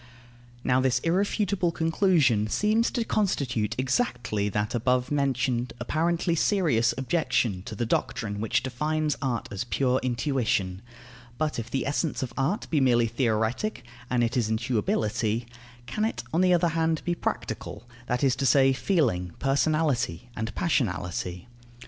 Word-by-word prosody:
Now 130 0 +3
this 130 -1 +2
irrefutable 185 0 +1
conclusion 160 - +2
seems 215 - +2
to 235 - -2
constitute 130 - 0
exactly 120 - 0
that 105 +1 -1
above 125 +2 +1
mentioned 130 -4 0
apparently 165 +6 0
serious 155 - +2
objection 130 - 0
to 110 - -6
the 120 - -1
doctrine 105 -2 -2
which 120 +2 +1
defines 150 +4 -1
art 125 -4 -1
as 100 - -3
pure 130 +1 +1
intuition. 120 -7 0 0.6
But 155 -4 -1
if 115 - -6
the 135 - -1
essence 145 +1 -1
of 125 - -5
art 150 - -1
be 150 -4 +3
merely 120 -3 +4
theoretic 115 - -1 0.3
and 125 -1 +2
it 115 0 0
is 115 -4 +1
intuibility 110 0 0 0.4
can 210 - -2
it, 220 - -1
on 165 - +3
the 185 -1 +4
other 170 0 +2
hand, 160 -1 0
be 175 - +1
practical, 120 -8 -4 0.2
that 125 +2 -1
is 135 -1 +3
to 135 - -1
say, 135 0 +5
feeling, 115 - 0
personality, 135 - 0
and 110 +1 -4
passionality? 90 - -1
130 Hz, 145 wpm, -27 LUFS, 115-160 Hz, 0.6 s, say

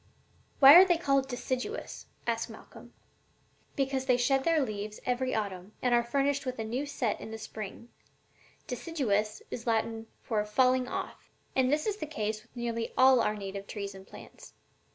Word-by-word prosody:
"And - - -33
why 275 +1 +11
are 355 +3 +11
they 355 -3 +3
called 275 -5 +1
deciduous?" 260 - -4 0.2
asked - - -1
Malcolm. - - -13 0.8
"Because 270 -1 -1
they 250 -2 +4
shed 265 +2 +2
their 330 -1 +3
leaves 215 -5 -3
every 255 +1 0
autumn 200 -2 -4
and 250 -1 +1
are 240 - +5
furnished 275 +3 0
with 255 -1 -4
a 225 - -3
new 250 +6 -3
set 245 -6 -2
in - - -7
the 220 - -6
spring: 220 +1 -8 0.8
'deciduous' 230 -7 -1
is 240 0 -6
Latin 225 0 -1 0.2
for 215 -3 0
'falling 255 +4 +2
off.' - - -6 0.3
And 260 0 +3
this 300 +1 +1
is 420 -1 -1
the 310 - -5
case 215 -6 -3
with 230 +3 -27
nearly 235 -1 -3
all 260 -1 +7
our 215 - +1
native 200 -1 -6
trees 200 -2 -5
and 190 0 -13
plants. - - -13
245 Hz, 175 wpm, -30 LUFS, 215-270 Hz, 0.8 s, why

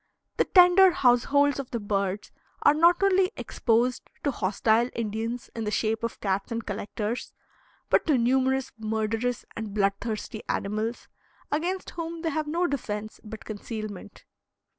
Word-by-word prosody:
The - - +3
tender 365 +1 +7
households 285 0 +3
of 275 - -5
the 235 - -3
birds 200 -1 -2 0.3
are 290 - +7
not 340 +4 +4
only 385 0 +4
exposed 240 +2 0
to 285 - +1
hostile 220 +3 +1
Indians 225 +2 -3
in 225 - -3
the 210 - -1
shape 220 +1 0
of 230 - -3
cats 195 +1 -1
and 230 0 -3
collectors, 210 +2 -4 0.5
but - - +2
to 300 -4 +4
numerous 260 +2 +1
murderous 220 +2 -1
and 215 -2 -5
bloodthirsty 215 +2 -1
animals, 215 +4 -2 0.4
against 355 +5 -2
whom 335 -1 -5
they 325 - 0
have 310 +1 -2
no 340 +4 0
defense 215 -8 -4
but 220 0 -9
concealment. 215 -2 -7
230 Hz, 140 wpm, -27 LUFS, 215-285 Hz, 0.5 s, tender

